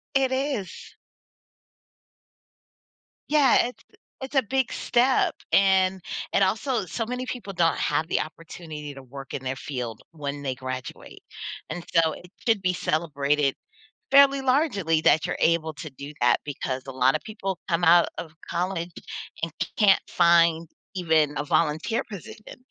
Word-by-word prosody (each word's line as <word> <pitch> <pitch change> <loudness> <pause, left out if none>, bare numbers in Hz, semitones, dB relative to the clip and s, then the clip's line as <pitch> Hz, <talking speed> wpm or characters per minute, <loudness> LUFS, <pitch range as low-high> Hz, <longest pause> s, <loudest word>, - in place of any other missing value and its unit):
It 265 -1 +3
is. 260 -8 -3 2.3
Yeah, 290 -5 +5
it's 250 - -11
the - - -25 0.2
it's 265 +2 -6
a 270 - +6
big 265 +2 -1
step 250 +2 +2 0.2
and 190 -1 +4 0.3
and 195 - +3
also 220 +3 0
so 225 +7 -3
many 250 +2 -4
people 240 -6 -6
don't 170 -1 +2
have 160 - 0
the - - +1
opportunity 155 -2 -8
to 135 -1 -11
work 135 +2 -10
in 135 - -4
their 130 +1 -2
field 125 -6 -5
when 145 -2 -5
they 130 -2 -2
graduate. 130 0 -7 0.5
And 175 - -5
so 165 -2 +4
it 180 - -12 0.2
should 220 -4 +3
be 185 -1 +2
celebrated 150 -5 0 0.6
fairly 275 0 +6
largely 230 - +2
that 160 - +4
you're - - -2
able 160 -1 +2
to 155 +1 -7
do 140 +2 -9
that 120 0 +4
because 130 -2 -4
a - - -5
lot 130 +2 +3
of 155 - -1
people 195 -4 -4
come 170 0 +1
out 170 +1 +6
of 160 -2 -7 0.2
college 175 -1 -2 0.5
and 165 - -1 0.3
can't 200 -3 +5
find 170 -1 +4 0.3
even 160 -5 +2
a 145 - -2
volunteer 160 +10 +1
position 210 +3 -10
170 Hz, 150 wpm, -25 LUFS, 150-210 Hz, 2.3 s, a